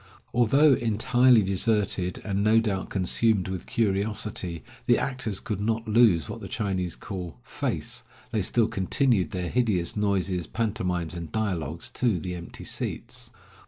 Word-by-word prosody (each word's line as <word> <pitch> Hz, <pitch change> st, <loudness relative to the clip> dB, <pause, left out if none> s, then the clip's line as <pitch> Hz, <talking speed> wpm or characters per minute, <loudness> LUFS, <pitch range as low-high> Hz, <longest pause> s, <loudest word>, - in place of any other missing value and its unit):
Although 135 Hz, +5 st, +5 dB
entirely 120 Hz, +1 st, +4 dB
deserted, 95 Hz, -2 st, 0 dB
and 100 Hz, -1 st, 0 dB
no 110 Hz, +2 st, +5 dB
doubt 100 Hz, -4 st, -2 dB
consumed 100 Hz, +1 st, +1 dB
with 95 Hz, -2 st, -5 dB
curiosity, 100 Hz, -4 st, -1 dB, 0.2 s
the -, -, +5 dB
actors 125 Hz, -7 st, -2 dB
could 105 Hz, -2 st, -4 dB
not 110 Hz, +1 st, -1 dB
lose 105 Hz, -8 st, +4 dB
what -, -, -7 dB
the -, -, -6 dB
Chinese 95 Hz, -5 st, -2 dB
call 90 Hz, -4 st, -7 dB
"face." -, -, -3 dB, 0.3 s
They 110 Hz, -, +1 dB
still 110 Hz, +4 st, +3 dB
continued 115 Hz, 0 st, +1 dB
their 90 Hz, -4 st, -3 dB
hideous 105 Hz, -9 st, +1 dB
noises, 95 Hz, -4 st, 0 dB
pantomimes, 90 Hz, -7 st, -2 dB
and 85 Hz, -2 st, -6 dB
dialogues 85 Hz, -7 st, -2 dB
to 120 Hz, -7 st, +1 dB
the 90 Hz, +2 st, -4 dB
empty 85 Hz, -1 st, -8 dB
seats. -, -, -4 dB
100 Hz, 140 wpm, -26 LUFS, 90-115 Hz, 0.3 s, Although